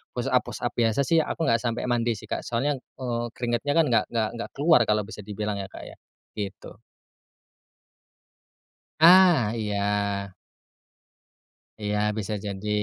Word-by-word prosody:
push-up-push-up -, -, -1 dB
biasa 115 Hz, +4 st, +2 dB
sih 165 Hz, +5 st, +3 dB
aku 160 Hz, +1 st, -2 dB
nggak 115 Hz, -5 st, +3 dB
sampai 120 Hz, -1 st, -2 dB
mandi 120 Hz, -1 st, +1 dB
sih, -, -, -11 dB
Kak. -, -, -3 dB
Soalnya, 135 Hz, +4 st, -1 dB
eee, 120 Hz, -2 st, -5 dB
keringatnya 120 Hz, +4 st, -1 dB
kan 165 Hz, -, +5 dB
nggak 110 Hz, -2 st, +3 dB
nggak 115 Hz, -2 st, 0 dB
nggak -, -, -5 dB
keluar 155 Hz, +1 st, +5 dB
kalau 105 Hz, 0 st, +2 dB
bisa 110 Hz, +1 st, -10 dB
dibilang 105 Hz, 0 st, -4 dB
ya, 95 Hz, -, -5 dB
Kak, -, -, -11 dB
ya, -, -, -11 dB, 0.4 s
gitu. 100 Hz, -2 st, -7 dB, 2.2 s
Ah, 170 Hz, -, +7 dB
iya. 100 Hz, -2 st, -1 dB, 1.5 s
Iya, 105 Hz, 0 st, -1 dB, 0.2 s
bisa 105 Hz, 0 st, -3 dB
jadi. 100 Hz, +1 st, -5 dB
115 Hz, 135 wpm, -25 LUFS, 105-125 Hz, 2.2 s, Ah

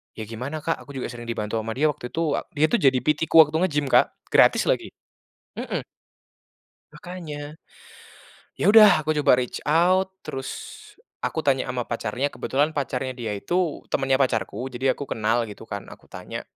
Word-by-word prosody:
Ya 110 Hz, -, -6 dB
gimana 135 Hz, +7 st, -5 dB
Kak? 165 Hz, -, 0 dB
Aku 140 Hz, -2 st, -12 dB
juga 130 Hz, -, -4 dB
sering 120 Hz, -1 st, -9 dB
dibantu 115 Hz, -1 st, -2 dB
ama 110 Hz, 0 st, -4 dB
dia 150 Hz, +3 st, +2 dB
waktu 125 Hz, -, -8 dB
itu 160 Hz, -3 st, 0 dB, 0.2 s
dia 150 Hz, +2 st, +4 dB
tuh 240 Hz, -, +3 dB
jadi 135 Hz, -2 st, +4 dB
PT-ku 150 Hz, +2 st, 0 dB
waktu 155 Hz, 0 st, +2 dB
nge -, -, -1 dB
gym 145 Hz, -2 st, 0 dB
Kak -, -, +4 dB, 0.2 s
gratis -, -, +5 dB
lagi, -, -, +1 dB, 0.7 s
mhm. -, -, -3 dB, 1.1 s
Makanya. 155 Hz, -4 st, -8 dB, 1.0 s
Ya 205 Hz, -, +3 dB
udah 210 Hz, -9 st, +7 dB
aku 155 Hz, -, +1 dB
coba 145 Hz, -4 st, +4 dB
reach 125 Hz, -1 st, -3 dB
out 185 Hz, +4 st, +2 dB
terus 135 Hz, -1 st, -5 dB, 0.7 s
aku 160 Hz, -2 st, -2 dB
tanya 135 Hz, -2 st, +1 dB
ama 125 Hz, -1 st, -2 dB
pacarnya 120 Hz, +4 st, -3 dB
kebetulan 145 Hz, +4 st, 0 dB
pacarnya 130 Hz, -3 st, -2 dB
dia 115 Hz, -5 st, -4 dB
itu 175 Hz, -, -2 dB
temennya 135 Hz, -1 st, +2 dB
pacarku 125 Hz, -3 st, -1 dB
jadi 130 Hz, +1 st, 0 dB
aku 140 Hz, -, -5 dB
kenal 115 Hz, +2 st, +1 dB
gitu 105 Hz, +1 st, -11 dB
kan 100 Hz, -1 st, -5 dB
aku -, -, -20 dB
tanya, -, -, -7 dB
135 Hz, 170 wpm, -24 LUFS, 120-155 Hz, 1.1 s, udah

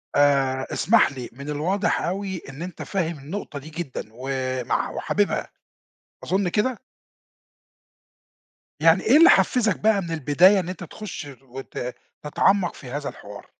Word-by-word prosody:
آآ، 135 Hz, -2 st, +3 dB
اسمح 220 Hz, -3 st, +4 dB
لي، 130 Hz, -3 st, -7 dB
من 140 Hz, +4 st, -9 dB
الواضح 180 Hz, +7 st, 0 dB
أوي 190 Hz, 0 st, -3 dB
إن 135 Hz, +3 st, -9 dB
أنت 180 Hz, +1 st, -7 dB
فاهم 170 Hz, -5 st, -2 dB
النقطة 145 Hz, 0 st, -6 dB
دي 150 Hz, -, -11 dB
جدًا، 160 Hz, -4 st, -5 dB
ومع 130 Hz, 0 st, -2 dB
وحاببها، -, -, -1 dB, 0.8 s
أظن 190 Hz, 0 st, 0 dB
كده؟ 220 Hz, +6 st, 0 dB, 2.0 s
يعني 165 Hz, +3 st, +4 dB
إيه 250 Hz, +7 st, +6 dB
اللي 335 Hz, +2 st, +8 dB
حفزك 220 Hz, -8 st, +3 dB
بقى 215 Hz, -2 st, +3 dB
من 170 Hz, -2 st, -6 dB
البداية 165 Hz, +6 st, +4 dB
إن 180 Hz, -, -4 dB
أنت 185 Hz, -1 st, -6 dB
تخش 175 Hz, -3 st, -7 dB
وت 130 Hz, -1 st, -7 dB, 0.3 s
تتعمق 180 Hz, +5 st, +2 dB
في 130 Hz, -, -11 dB
هذا 145 Hz, 0 st, -3 dB
الحوار؟ -, -, -11 dB
165 Hz, 135 wpm, -24 LUFS, 135-195 Hz, 2.0 s, اللي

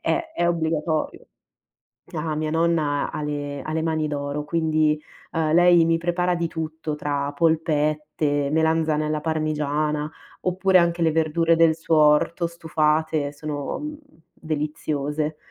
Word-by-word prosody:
è 340 Hz, -, 0 dB
è 175 Hz, -, +1 dB
obbligatorio. 160 Hz, -1 st, -1 dB, 0.9 s
Ah 155 Hz, 0 st, -2 dB
mia 155 Hz, 0 st, -2 dB
nonna 160 Hz, -3 st, +1 dB
ha -, -, -4 dB
le 145 Hz, -2 st, -4 dB
ha 155 Hz, -, -5 dB
le 160 Hz, 0 st, -1 dB
mani 160 Hz, -1 st, 0 dB
d'oro, 145 Hz, 0 st, -3 dB
quindi, 155 Hz, -1 st, +1 dB, 0.3 s
uhm, 160 Hz, -2 st, 0 dB
lei 175 Hz, 0 st, +6 dB
mi 165 Hz, 0 st, +2 dB
prepara 175 Hz, +1 st, 0 dB
di 170 Hz, -1 st, -1 dB
tutto, 160 Hz, -1 st, -4 dB
tra 145 Hz, -1 st, -2 dB
polpette, 150 Hz, -2 st, 0 dB
melanzane 160 Hz, -1 st, +1 dB
alla 150 Hz, 0 st, -1 dB
parmigiana 150 Hz, -1 st, -1 dB, 0.3 s
oppure 185 Hz, +1 st, +3 dB
anche 170 Hz, 0 st, +1 dB
le 160 Hz, -1 st, +3 dB
verdure 165 Hz, +1 st, +2 dB
del 165 Hz, -1 st, +4 dB
suo 165 Hz, 0 st, 0 dB
orto 155 Hz, +3 st, +3 dB
stufate 155 Hz, -2 st, 0 dB
sono, 145 Hz, -1 st, -4 dB
mhmm, 300 Hz, +1 st, -6 dB, 0.4 s
deliziose. 150 Hz, -1 st, -3 dB
155 Hz, 135 wpm, -23 LUFS, 150-165 Hz, 0.9 s, lei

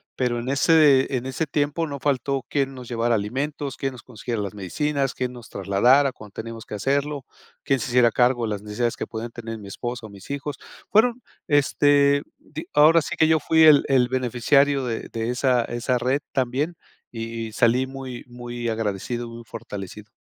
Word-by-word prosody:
pero 125 Hz, -2 st, 0 dB
en 120 Hz, -, -6 dB
ese 140 Hz, -2 st, +4 dB
en 125 Hz, -, -5 dB
ese 130 Hz, +5 st, -2 dB
tiempo 145 Hz, +3 st, 0 dB
no 140 Hz, -1 st, -6 dB
faltó 135 Hz, -1 st, -1 dB
quién 135 Hz, -1 st, 0 dB
nos 125 Hz, -2 st, -9 dB
llevara 120 Hz, 0 st, +1 dB
alimentos, 135 Hz, +6 st, -3 dB
quién 135 Hz, -1 st, -2 dB
nos 120 Hz, -, -12 dB
consiguiera 115 Hz, -2 st, -5 dB
las 100 Hz, -1 st, -4 dB
medicinas, 135 Hz, -, -1 dB
quién 125 Hz, -1 st, -3 dB
nos 120 Hz, -2 st, -12 dB
trasladara 120 Hz, +8 st, +3 dB
cuando 105 Hz, -4 st, -13 dB
teníamos 115 Hz, 0 st, -7 dB
que -, -, -6 dB
hacerlo, 140 Hz, +5 st, -1 dB, 0.4 s
quién 135 Hz, -2 st, +1 dB
se 120 Hz, -, -3 dB
hiciera 120 Hz, -1 st, +5 dB
cargo 120 Hz, 0 st, +2 dB
de 110 Hz, -, -3 dB
las 105 Hz, -1 st, -3 dB
necesidades 110 Hz, +3 st, -1 dB
que -, -, -3 dB
podían 115 Hz, +1 st, -6 dB
tener 115 Hz, -1 st, -7 dB
mi 100 Hz, -, -10 dB
esposa 120 Hz, +3 st, -5 dB
o -, -, -15 dB
mis 100 Hz, +2 st, -13 dB
hijos. 140 Hz, 0 st, -4 dB, 0.3 s
Fueron, 240 Hz, +3 st, +3 dB, 0.3 s
este, 145 Hz, 0 st, +4 dB, 0.2 s
di 155 Hz, +2 st, -9 dB
ahora 155 Hz, +3 st, +6 dB
sí 175 Hz, -, -5 dB
que 160 Hz, -, +4 dB
yo 160 Hz, -1 st, +4 dB
fui 160 Hz, 0 st, +4 dB
el 150 Hz, -2 st, +8 dB
el 130 Hz, -2 st, +4 dB
beneficiario 130 Hz, +2 st, +2 dB
de 115 Hz, -2 st, -4 dB
de 115 Hz, +1 st, -3 dB
esa 125 Hz, -1 st, +2 dB
esa 120 Hz, +1 st, -1 dB
red 130 Hz, +4 st, +1 dB
también, 135 Hz, +6 st, -1 dB, 0.4 s
y 115 Hz, 0 st, -5 dB
y -, -, -13 dB
salí 120 Hz, +3 st, +3 dB
muy 130 Hz, -2 st, -7 dB
muy 120 Hz, -1 st, -5 dB
agradecido, 115 Hz, +2 st, -3 dB
muy 115 Hz, 0 st, -10 dB
fortalecido. 105 Hz, -2 st, -8 dB
125 Hz, 190 wpm, -24 LUFS, 115-140 Hz, 0.4 s, el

